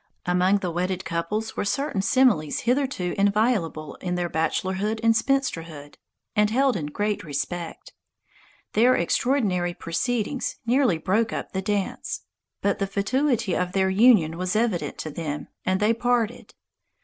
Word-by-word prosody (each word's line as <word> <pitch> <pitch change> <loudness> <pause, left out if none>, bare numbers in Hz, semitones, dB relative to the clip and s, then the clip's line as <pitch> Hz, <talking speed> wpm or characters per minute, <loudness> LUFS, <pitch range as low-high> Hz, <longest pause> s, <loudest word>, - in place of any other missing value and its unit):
Among 180 +3 +3
the 185 -3 -3
wedded 180 +2 -2
couples 170 +7 -2
were - - -1
certain 275 0 -1
similes 205 - +2
hitherto 250 -7 0
inviolable 200 - +1
in 180 -1 -2
their 175 -1 -1
bachelorhood 190 +7 -1
and 230 0 +5
spinsterhood, 165 - -1 0.4
and 210 0 +4
held 265 +3 +2
in 155 -6 -3
great 205 +7 -2
respect. 165 +3 -5 0.8
Their 245 +4 +5
extraordinary 180 -3 +1
proceedings 240 +9 -2
nearly 245 - +3
broke 215 +7 +1
up - - -4
the 190 - -2
dance. 200 0 -2 0.4
But 200 -1 +1
the 195 - 0
fatuity 225 - 0
of 180 0 -1
their 190 -1 +2
union 190 -6 +4
was 185 +2 -1
evident 220 -6 0
to 155 - -5
them, 150 -1 -5 0.2
and 185 0 +2
they 215 +2 +3
parted. 240 -1 -1
195 Hz, 140 wpm, -25 LUFS, 175-230 Hz, 0.8 s, and